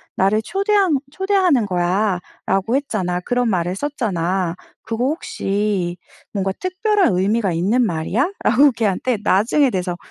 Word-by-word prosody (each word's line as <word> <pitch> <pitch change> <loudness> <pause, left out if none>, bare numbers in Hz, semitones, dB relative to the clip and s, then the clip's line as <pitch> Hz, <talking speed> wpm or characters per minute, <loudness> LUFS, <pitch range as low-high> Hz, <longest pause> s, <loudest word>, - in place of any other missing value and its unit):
나를 200 +3 +2
초대하는 390 - +1
초대하는 370 - +2
거야라고 190 +3 -1
했잖아. 200 -11 -1
그런 245 +3 0
말을 180 -1 0
썼잖아. 190 - -1 0.3
그거 230 +2 -2
혹시 200 - -1 0.4
뭔가 195 -2 -1
특별한 375 - +1
의미가 200 +1 +1
있는 200 +10 +1
말이야?" 215 - 0
라고 275 +5 +5
걔한테 230 +1 0
나중에 235 +8 +3
돼서 180 -3 -2
215 Hz, 305 characters per minute, -20 LUFS, 185-280 Hz, 0.4 s, 라고